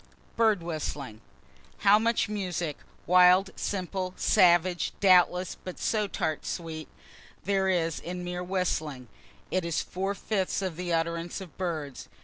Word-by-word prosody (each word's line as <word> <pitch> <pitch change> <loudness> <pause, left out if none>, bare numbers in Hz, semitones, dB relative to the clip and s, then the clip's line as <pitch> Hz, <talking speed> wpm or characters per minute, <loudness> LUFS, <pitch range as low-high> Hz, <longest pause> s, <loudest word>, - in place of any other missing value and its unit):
BIRD 220 -6 +3
WHISTLING 145 -8 -5 0.6
How 205 +1 +7
much 230 +1 +1
music 180 -7 -3 0.3
(wild, 180 +2 +6
simple, 185 -1 -3
savage, 175 -2 +3
doubtless, 180 -1 +4
but 185 - -7
so 215 -2 0
tart 155 -5 -2
sweet,) 160 -2 -5 0.6
there 195 0 +1
is 165 -3 0
in 180 +1 -6
mere 180 0 -4
whistling. 160 - -2 0.4
It 185 - +1
is 170 -1 -1
four 195 +2 -3
fifths 195 -2 -1
of 185 -4 -3
the 175 +1 -4
utterance 170 +1 -1
of 185 -5 -11
birds. 155 -7 -4
180 Hz, 130 wpm, -28 LUFS, 165-190 Hz, 0.6 s, How